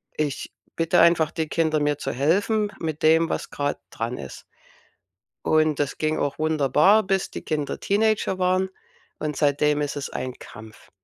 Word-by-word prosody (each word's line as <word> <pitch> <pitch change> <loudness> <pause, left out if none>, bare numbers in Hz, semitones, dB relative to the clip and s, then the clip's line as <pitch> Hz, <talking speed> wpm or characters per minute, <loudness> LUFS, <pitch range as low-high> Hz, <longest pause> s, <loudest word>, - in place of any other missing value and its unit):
Ich 150 -3 -3 0.2
bitte 165 0 +2
einfach 165 -2 +5
die 160 -2 -2
Kinder, 155 -1 +1
mir 145 -1 0
zu - - -3
helfen 205 - +1
mit 160 -2 -4
dem, 160 +1 +4
was - - -3
grade 145 0 -2
dran 115 +2 -4
ist. 65 - -9 1.0
Und 155 -2 +2
das 145 -1 -2
ging 155 0 0
auch 145 -1 -2
wunderbar, 155 - +4
bis 195 -1 -1
die - - -7
Kinder 150 -3 -3
Teenager 210 -2 +1
waren, 185 +1 +1 0.5
und 150 -2 -3
seitdem 150 0 +2
ist 145 - -3
es 145 -2 -4
ein 130 - -4
Kampf. 110 +1 -13
155 Hz, 165 wpm, -24 LUFS, 145-175 Hz, 1.0 s, einfach